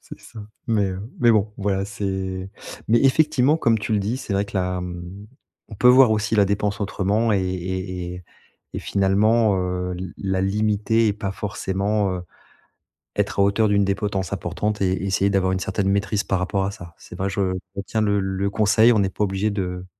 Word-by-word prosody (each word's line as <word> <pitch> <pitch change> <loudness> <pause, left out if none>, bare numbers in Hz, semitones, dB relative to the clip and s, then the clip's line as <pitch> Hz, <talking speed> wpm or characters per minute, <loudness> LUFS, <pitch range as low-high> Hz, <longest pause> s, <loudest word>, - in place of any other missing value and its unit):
C'est - - -12
ça 115 - -13 0.3
mais 105 -3 +2
heu, 95 0 -4 0.2
mais 120 -1 +5
bon, 105 0 +1
voilà, 100 -1 0
c'est 95 -2 -4 0.4
mais 115 +1 +4
effectivement, 150 +1 +3
comme 115 -5 +3
tu 105 +1 -3
le 105 - +3
dis, 105 +6 -1
c'est 120 -6 -5
vrai 100 +1 +1
que 100 - -6
là, 90 -1 -1
mmh, 90 +3 -8 0.4
on 110 - -9
peut 125 - +1
voir 125 -2 +7
aussi 105 0 0
la 100 - +5
dépense 100 +1 -1
autrement 105 +2 0
et 100 - +3
et 90 0 -4
et 90 -1 -10 0.5
et - - -2
finalement, 100 +1 +2
heu, 90 0 -2
l 90 -2 -7
la 95 -1 -1
limiter 105 +3 +1
et - - +2
pas 100 -2 -4
forcément, 100 0 -1
heu, 90 - -5 0.9
être - - -1
à 100 - +6
hauteur 105 +2 +2
d'une 100 -1 +3
des 100 - +1
potences 95 -2 -3
importantes 105 -1 -3
et 95 0 +1
essayer 95 +1 +1
d'avoir 95 -2 +1
une 95 - -1
certaine 95 +1 -1
maîtrise 100 +1 0
par 95 - -1
rapport 95 +1 -1
à 100 - -2
ça. 85 -3 -11
C'est - - -12
vrai, 95 +1 -1
je 95 -2 -1 0.2
retiens 100 +3 -2
le 100 -1 +2
le 95 +1 -1
conseil, 110 +3 +4
on 105 - +2
n'est 95 -1 +1
pas 105 - -2
obligé 95 +2 -1
de 90 -2 -4
100 Hz, 205 wpm, -22 LUFS, 95-105 Hz, 0.9 s, voir